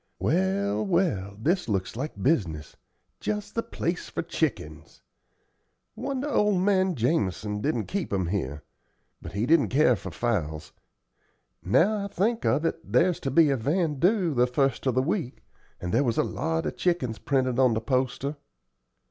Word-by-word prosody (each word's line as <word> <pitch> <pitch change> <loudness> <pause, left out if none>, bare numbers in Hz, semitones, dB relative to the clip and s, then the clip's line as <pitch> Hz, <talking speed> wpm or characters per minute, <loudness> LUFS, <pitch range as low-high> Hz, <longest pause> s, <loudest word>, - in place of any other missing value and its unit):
Well, 100 +2 +1
well, 160 - 0
this 175 - 0
looks 95 -1 -1
like 125 -6 -5
business 90 - 0 0.4
just 210 -1 -3
the 230 - 0
place 180 -6 -3
for - - -3
chickens. 130 - -4 0.9
Wonder 270 +4 -3
old 210 -9 +2
man 190 -1 +2
Jamison 105 - -1
didn't 120 -5 0
keep 195 -3 -3
'em 95 -2 0
here; 80 -6 -3 0.6
but - - -9
he 100 +3 0
didn't 160 +2 +4
care 130 -2 +4
for 95 - -7
fowls. 80 -6 -2 0.9
Now 200 - +2
I - - -3
think 210 +4 -1
of 150 +5 +2
it, 165 - -1
there's 175 0 +3
to 135 - -3
be 150 +2 +5
a - - +2
vandoo 170 - +1
the 125 -1 +3
first 135 +1 0
of 130 - +1
the 130 - +3
week, 155 -4 -3 0.4
and 90 +1 -4
there 125 +5 +4
was 120 -4 0
a - - +4
lot 160 +4 -2
o' - - -1
chickens 135 -11 -1
printed 130 -2 0
on 125 -4 +4
the - - +1
poster." 130 +3 -1
135 Hz, 160 wpm, -26 LUFS, 105-175 Hz, 0.9 s, be